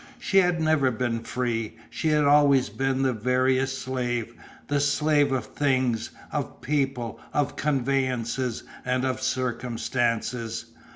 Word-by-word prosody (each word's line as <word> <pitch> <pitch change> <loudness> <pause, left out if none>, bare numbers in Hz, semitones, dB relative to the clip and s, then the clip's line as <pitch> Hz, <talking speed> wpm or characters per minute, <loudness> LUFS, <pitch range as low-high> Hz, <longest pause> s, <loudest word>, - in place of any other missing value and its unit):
She 195 - +3
had 180 -2 +2
never 155 -4 +3
been 120 -1 -1
free, 115 -2 -3
she - - -2
had 150 -1 +3
always 140 -2 +5
been 135 0 0
the 130 -1 +2
veriest 130 +3 +1
slave, 120 -3 -2 0.3
the 145 0 +1
slave 145 0 +2
of 130 -4 0
things, 130 -4 0 0.2
of - - -3
people, 135 -5 -1
of 145 -1 0
convenances, 130 -3 0 0.2
and 125 +1 0
of 130 0 -1
circumstances. 120 -2 -1
130 Hz, 125 wpm, -26 LUFS, 120-140 Hz, 0.3 s, always